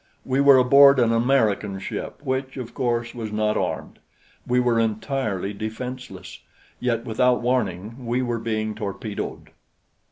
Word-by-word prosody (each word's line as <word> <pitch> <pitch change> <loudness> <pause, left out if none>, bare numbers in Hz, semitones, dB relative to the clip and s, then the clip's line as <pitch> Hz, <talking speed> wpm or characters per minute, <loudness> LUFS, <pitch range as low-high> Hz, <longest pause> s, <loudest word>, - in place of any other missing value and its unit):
We 135 +1 +1
were 140 -1 +7
aboard 140 +2 +7
an 120 -2 +3
American 115 -5 +1
ship 95 - -6
which, 130 -1 -3
of 125 -3 -6
course, 120 -2 -1
was 115 -3 -6
not 105 0 0
armed. - - -3 0.5
We 125 0 +2
were 120 -2 +2
entirely 110 -3 -2
defenseless; 110 -3 -7 0.4
yet 115 -2 -1
without 125 +2 +2
warning, 115 -1 -2
we 125 +2 0
were 120 -2 -2
being 110 -1 -2
torpedoed. 105 0 -6
115 Hz, 135 wpm, -23 LUFS, 110-125 Hz, 0.5 s, were